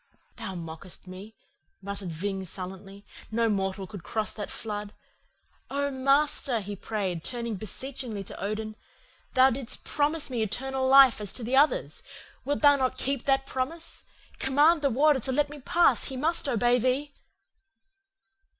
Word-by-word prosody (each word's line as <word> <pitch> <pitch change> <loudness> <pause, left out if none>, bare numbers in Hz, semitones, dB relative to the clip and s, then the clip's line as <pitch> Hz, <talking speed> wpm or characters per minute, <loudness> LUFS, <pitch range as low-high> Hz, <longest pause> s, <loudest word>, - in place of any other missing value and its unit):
"'Thou 190 - -5
mockest 165 +2 -8
me,' 190 +4 -10 0.4
muttered 200 -2 -5
Ving 190 +4 -3
sullenly. 190 +2 -6 0.3
'No 230 +1 +2
mortal 195 -1 -1
could 200 -1 -9
cross 215 +2 -2
that 210 - -6
flood. 210 -2 -5 0.7
Oh, 280 0 -1
Master,' 275 -2 +2
he 205 0 -6
prayed, 190 -5 -3
turning 235 -2 -3
beseechingly 225 +1 -5
to 195 - -9
Odin, 215 +1 -3 0.6
'thou 260 +1 +6
didst 250 -1 -4
promise 300 +1 +1
to - - -3
me 240 -3 -1
eternal 265 +5 -1
life 270 -4 +7
as 205 -2 0
to 245 - -5
the 245 +4 0
others. 310 - +2 0.4
Wilt 285 +1 -1
thou 285 -1 +7
not 255 -1 0
keep 270 -1 -1
that 270 -1 +2
promise? 285 +6 -3 0.4
Command 295 +5 +4
the 280 - +3
Warder 285 +3 +4
to 260 - -1
let 290 +2 +1
me 295 - -9
pass. 340 +6 +3
He 265 - -4
must 315 +1 +1
obey 245 0 +3
thee. 265 +4 0
245 Hz, 155 wpm, -28 LUFS, 205-275 Hz, 0.7 s, life